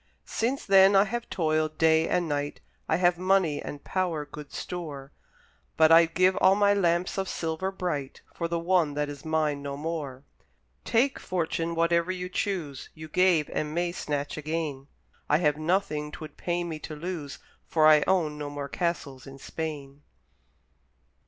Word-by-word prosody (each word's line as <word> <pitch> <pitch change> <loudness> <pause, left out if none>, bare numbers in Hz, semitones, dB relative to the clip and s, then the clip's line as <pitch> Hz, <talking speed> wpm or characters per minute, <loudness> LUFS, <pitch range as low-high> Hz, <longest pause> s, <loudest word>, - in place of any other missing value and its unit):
Since 250 +5 -2
then 195 0 +6
I 195 - +7
have 235 +3 -4
toiled 155 -2 0
day 160 0 +4
and 180 -1 +1
night, 145 -1 -2 0.3
I 160 - +3
have 175 0 +2
money 185 -5 +2
and 145 - -7
power 175 -5 -1
good 150 0 -10
store, 145 -6 -6 0.7
But 160 0 +6
I'd 165 0 +6
give 185 +1 +4
all 190 - +5
my 205 0 +4
lamps 180 -1 +1
of 190 - -2
silver 165 +3 -2
bright 160 -8 -4
For 170 - -3
the 170 0 -1
one 170 -3 +1
that 150 0 -1
is 145 -1 -8
mine 155 -2 0
no 140 0 -5
more; 145 -4 -5 0.6
Take, 255 +4 +2
Fortune, 170 -1 -2
whatever 170 +1 +2
you 180 -1 -4
choose, 175 -8 -3
You 155 0 -9
gave, 180 -3 +3
and 150 0 -2
may 175 0 0
snatch 145 -5 -3
again; 150 -3 -3 0.4
I 150 - +5
have 150 -3 +1
nothing 155 -2 -1
'twould 155 -2 -9
pain 175 0 -2
me 160 -2 -5
to 155 - -7
lose, 150 -3 -5 0.3
For 155 -2 +3
I 155 -1 +7
own 160 -6 +1
no 145 -1 -4
more 145 -1 -6
castles 145 -7 -3
in 135 0 -10
Spain! 145 -2 -6
160 Hz, 165 wpm, -27 LUFS, 150-180 Hz, 0.7 s, I